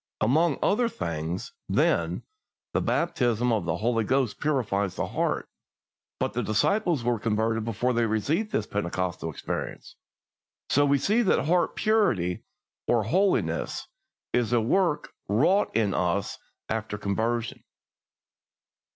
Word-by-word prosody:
Among 150 +7 +3
other 230 +4 +2
things, 85 - -4 0.2
then, - - +1 0.5
the - - +1
baptism 120 -1 +1
of 105 -6 0
the 85 0 -1
Holy 115 +2 +1
Ghost 130 0 0
purifies 100 -10 0
the - - -1
heart; - - -1 0.7
but - - -1
the 120 - -1
disciples 145 - +1
were 120 -2 +1
converted 110 0 0
before 115 +3 0
they 120 -1 +2
received 150 - 0
this 105 - 0
Pentecostal 90 -4 -2
experience, 80 - -5 0.7
so 145 +1 +4
we 140 0 +4
see 210 - +2
that 195 - +2
heart 175 +3 +2
purity, 120 - +1 0.4
or 120 -2 +3
holiness, 190 - 0 0.5
is 120 -2 +1
a 120 - +5
work 150 - +1 0.2
wrought 160 - +3
in 105 -3 +2
us 90 +2 -1 0.3
after 110 -1 -3
conversion. 115 +4 -2
115 Hz, 125 wpm, -27 LUFS, 105-145 Hz, 0.7 s, a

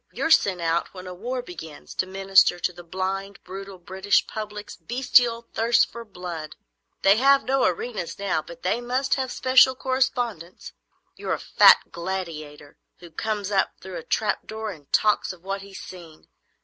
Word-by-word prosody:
you're 325 - -2
sent 195 - +4
out 170 +2 -1
when 185 0 -9
a 180 - -7
war 245 +7 -4
begins, 160 -7 -10
to 185 - -1
minister 190 -1 +4
to 180 - -2
the 175 0 -11
blind, 190 +3 -4
brutal, 195 +1 -8
British 190 +3 +1
public's 210 -1 -7
bestial 245 -2 +2
thirst 230 +1 +3
for 235 0 -8
blood. 175 -7 -7 0.5
They 195 +2 +6
have 275 +2 +5
no 270 +1 +2
arenas 185 0 -2
now, 195 -5 -1
but 170 +2 -13
they 220 +6 0
must 255 +3 0
have 260 -2 -1
special 260 0 +5
correspondents. 245 -9 -2 0.4
You're - - -2
a - - -2
fat - - +6
gladiator 165 -5 -6 0.2
who 175 -1 -14
comes 210 +3 -3
up 195 -1 +1
through 185 -1 -8
a 165 - -7
trap 215 -2 -1
door 220 0 -5
and 150 -6 -14
talks 210 -1 +2
of 180 -2 -13
what 195 +1 -3
he's 195 -1 -10
seen. 170 -4 -12
195 Hz, 170 wpm, -24 LUFS, 175-230 Hz, 0.5 s, They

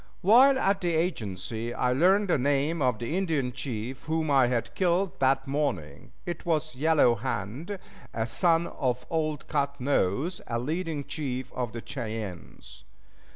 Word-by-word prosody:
While 255 +8 +7
at 195 -5 +1
the 175 -2 0
agency 115 - -2
I 125 0 +1
learned 190 +9 +4
the 165 - +3
name 145 +4 +1
of 125 -4 +2
the 120 +8 -3
Indian 160 -9 0
chief 125 -1 -5
whom 160 -1 0
I 135 -3 +5
had 120 -2 -1
killed 180 0 +1
that 135 0 +2
morning; 105 - -3
it 175 - -5
was 155 -2 0
Yellow 150 -2 +4
Hand, 130 - -4 0.3
a 110 -1 -1
son 165 +7 +2
of 125 -4 -2
old 155 -3 -1
Cut 140 0 -1
Nose, 135 - 0
a 115 - -1
leading 155 +3 -2
chief 130 -4 -4
of 125 -3 -3
the 115 0 -7
Cheyennes. 110 -8 -7
140 Hz, 155 wpm, -28 LUFS, 120-165 Hz, 0.3 s, While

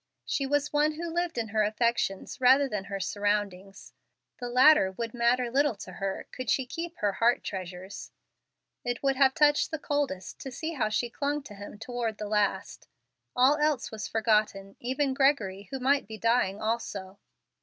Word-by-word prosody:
She 275 - -1
was 290 +1 0
one 300 +1 +3
who 330 +1 -5
lived 345 -3 -1
in 225 -2 -2
her 215 +1 +1
affections 215 -1 -1
rather 265 +3 +6
than 210 -6 -4
her 195 0 -5
surroundings. 200 -1 -2 0.5
The 245 -1 -4
latter 250 -5 +6
would 230 +2 -5
matter 240 0 +1
little 280 -1 +2
to 185 - -9
her 195 +1 -4
could 255 -3 -6
she 265 - +2
keep 335 +6 -6
her 205 -1 +1
heart 230 +5 +2
treasures. 185 0 -7 0.7
It 245 +1 -3
would 270 -1 +2
have 265 0 +4
touched 295 -2 +4
the 315 - -3
coldest 285 -11 -3
to 270 - -6
see 315 +6 -4
how 240 -8 0
she 235 +2 -1
clung 290 +1 -2
to 235 - -11
him 205 +1 -10
toward 225 -1 -3
the 210 - -5
last. 210 -1 -1 0.5
All 260 +4 +5
else 300 -4 0
was 215 -2 -5
forgotten, 210 -3 0
even 265 +2 -1
Gregory, 215 -9 +1
who 270 - -4
might 275 -2 +2
be 220 0 -7
dying 230 -4 +1
also. 205 -4 -3
235 Hz, 175 wpm, -28 LUFS, 205-275 Hz, 0.7 s, rather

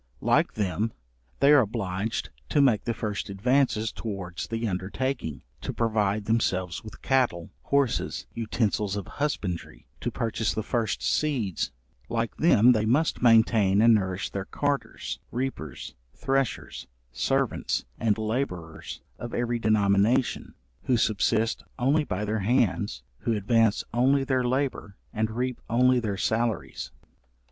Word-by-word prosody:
Like - - +2
them, 105 +2 -1 0.5
they 140 +1 +6
are 145 - +8
obliged 105 - -2 0.2
to - - +2
make 130 -7 +4
the 115 - 0
first 105 -3 -3
advances 110 +1 +1
towards 100 -6 -5
the 115 0 -2
undertaking, 95 - -3 0.2
to - - -3
provide 105 -3 +1
themselves 95 -5 0
with 110 -2 -11
cattle, 120 -11 +1
horses, 130 - 0
utensils 105 -3 -1
of 100 - -4
husbandry, 95 - -3
to - - -2
purchase 110 -2 -1
the 110 - -1
first 115 -1 -1
seeds; 125 - 0 0.4
like 115 0 -1
them 125 -7 +6
they 110 -2 +2
must 150 +8 +2
maintain 110 -4 +5
and 115 +1 +7
nourish 95 -2 0
their 95 -1 -4
carters, 145 +4 -2
reapers, 120 - -4 0.2
threshers, 135 - -2 0.2
servants, 125 - 0
and 110 -2 +2
labourers, 110 -8 -4 0.2
of 120 - -5
every 120 0 0
denomination, 105 +2 +2 0.3
who 125 - +3
subsist 110 +1 +1
only 140 +5 +2
by 105 -1 -2
their 110 +1 -1
hands, 100 - +1 0.2
who 115 - 0
advance 110 +1 +2
only 135 +3 +3
their 130 -2 +1
labour, 130 -5 -1 0.2
and 110 0 0
reap 125 +2 -3
only 125 +2 +4
their 105 -4 -2
salaries. 110 - -1
110 Hz, 130 wpm, -27 LUFS, 100-125 Hz, 0.5 s, are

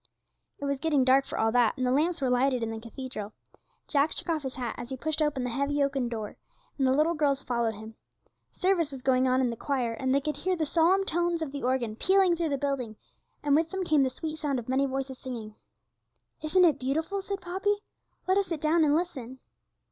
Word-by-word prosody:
It 285 - -5
was 280 -1 -1
getting 295 -3 +2
dark 265 +1 +4
for - - -5
all 225 0 +2
that, 240 -1 +3
and 255 - 0
the 250 - +2
lamps 320 +5 +1
were 260 - +1
lighted 250 -1 +2
in 225 - -2
the 225 - -5
cathedral. 230 -2 -7 0.5
Jack 290 +1 +2
took - - -3
off 320 -2 +1
his 265 -2 -5
hat 245 -3 -3
as 240 0 -7
he 265 - -5
pushed 315 +3 -1
open 295 -4 0
the 250 - -2
heavy 280 +3 0
oaken 275 -3 0
door, 220 -3 -5 0.4
and 265 - +3
the - - +3
little 305 +5 +3
girls 285 -3 +1
followed 235 -3 -1
him. 220 +2 -10 0.6
Service 365 -5 +1
was 270 -3 -8
going 260 0 +3
on 255 +1 +3
in 250 -2 +1
the - - -4
choir, 250 -2 -1
and 260 +3 -2
they 275 - +4
could 295 0 -3
hear 370 0 0
the 325 -2 -1
solemn 350 +5 +3
tones 345 -1 +1
of 290 - -5
the 280 0 -5
organ 245 -3 0
pealing 375 - +3
through 335 -1 -1
the 280 - 0
building, 265 -5 -2 0.5
and 285 -1 +3
with 320 +1 +2
them 380 +2 -3
came 310 -5 +3
the 265 - +3
sweet 310 +4 -6
sound 285 -3 -1
of 240 - -6
many 265 +2 +2
voices 265 -1 -4
singing. 230 -5 -6 0.9
'Isn't 360 +4 +4
it 305 -5 +3
beautiful?' 320 +9 -1
said 395 0 -4
Poppy; 385 +3 0 0.5
'let 375 +2 +4
us 395 - -1
sit 330 -3 -3
down 315 +2 +3
and 295 -1 +4
listen.' 270 -8 -3
275 Hz, 230 wpm, -28 LUFS, 255-320 Hz, 0.9 s, dark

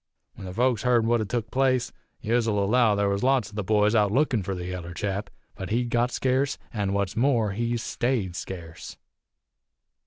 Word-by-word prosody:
When 95 - -9
the 90 - -6
folks 120 -2 +2
heerd 120 -2 +3
what 120 +1 +2
had 110 -3 -3
tuk 115 -1 -2
place, 130 -2 +1 0.3
yez'll 115 -1 +1
allow 105 +2 +3
there 100 0 +1
was 100 0 0
lots 130 -3 +2
o' - - -19
the 105 - -2
boys 105 +2 +2
out 105 -3 +3
lookin' 130 -2 +2
for 95 +1 -3
the 90 -1 -5
yaller 90 -1 -6
chap. 100 0 -3 0.2
But 95 - -7
he'd 120 +2 0
got 120 +1 +2
scarce, 130 +2 0 0.2
an' 100 -3 -1
what's 100 -2 -1
more, 115 -4 +2
he's 115 +3 -2
stayed 115 -8 -1
scarce. 85 -4 -8
110 Hz, 190 wpm, -26 LUFS, 100-120 Hz, 0.3 s, heerd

